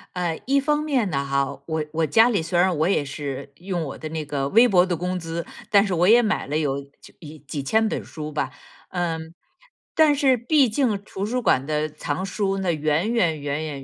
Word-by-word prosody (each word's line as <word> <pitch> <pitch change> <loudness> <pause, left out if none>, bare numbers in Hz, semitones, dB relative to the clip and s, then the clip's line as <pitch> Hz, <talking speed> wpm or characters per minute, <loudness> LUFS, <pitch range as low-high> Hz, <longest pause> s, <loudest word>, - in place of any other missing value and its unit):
呃， 175 -3 -2
一 275 +1 +2
方 300 +1 +1
面 265 -10 0
呢 140 -2 -1
哈， 140 0 -1
我 160 -1 -2
我 160 0 0
家 225 - +5
里 200 -8 +1
虽 170 +2 -2
然 180 -1 +3
我 160 +3 +2
也 190 -7 +2
是 140 -1 -6
用 175 -2 -3
我 140 - -6
的 155 - -6
那 160 -1 -4
个 140 -2 -2
微 230 +10 +6
薄 185 -6 +4
的 180 -2 -1
工 180 +2 -3
资， 165 0 -5 0.2
但 205 0 +5
是 190 - -2
我 175 +2 +3
也 235 +3 +7
买 215 -9 -1
了 150 +2 -1
有 140 -2 -1 0.2
就 - - -15
一 155 -1 -10
几 145 0 -6
千 220 +10 +2
本 - - -2
书 155 -1 -7
吧， 145 -3 -2 0.4
嗯。 165 -2 -3 0.6
但 310 -2 +5
是 270 -3 +3
毕 265 +2 +3
竟 230 -2 +1
图 195 -1 -4
书 250 +3 -1
馆 135 - +2
的 155 0 -1
藏 150 +3 -4
书 195 0 -1
呢， 185 -3 0
远 155 +7 0
远 170 -10 +1
远 145 +2 -2
远 140 -3 -6
170 Hz, 240 characters per minute, -23 LUFS, 150-215 Hz, 0.6 s, 也